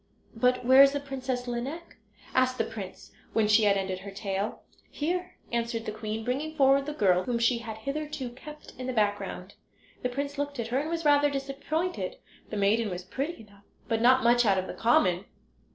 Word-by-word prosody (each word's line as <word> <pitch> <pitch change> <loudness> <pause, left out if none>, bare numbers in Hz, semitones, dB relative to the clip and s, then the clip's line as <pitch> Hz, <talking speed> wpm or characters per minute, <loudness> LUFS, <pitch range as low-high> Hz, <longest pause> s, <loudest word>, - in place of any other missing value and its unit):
"But 250 +2 +2
where 260 +2 +8
is 275 0 +7
the 285 - 0
Princess 260 -3 -4
Lineik?" 270 +8 -5 0.4
asked 255 0 +2
the 225 - +2
prince 205 -5 -8 0.2
when 220 -2 +3
she 215 +1 +5
had 200 -1 +4
ended 190 -1 -2
her 200 +1 -8
tale. 200 +1 -3 0.3
"Here," 360 +4 -2 0.2
answered 235 -1 -2
the - - -2
queen, 220 +1 -4
bringing 290 +6 -2
forward 275 0 +4
the 300 - -3
girl, 185 -8 +3
whom 245 -2 0
she 235 +1 +2
had 225 -2 -7
hitherto 275 +1 -4
kept 300 +4 -11
in 255 - -4
the 255 - -2
background. 205 -3 -1 0.5
The 250 - -1
prince 280 +3 -4
looked 285 -2 -3
at 230 -1 -3
her 255 +3 +1
and 300 +3 -3
was 335 -1 -3
rather 290 0 +5
disappointed. 275 - -3 0.3
The 215 - -4
maiden 210 +2 +2
was 180 -1 -5
pretty 275 - -4
enough, 200 -1 -20 0.2
but 225 -1 0
not 255 +2 +5
much 240 +1 +5
out 200 -4 +3
of 185 - -1
the - - -6
common. 190 -5 +2
245 Hz, 200 wpm, -28 LUFS, 215-275 Hz, 0.5 s, where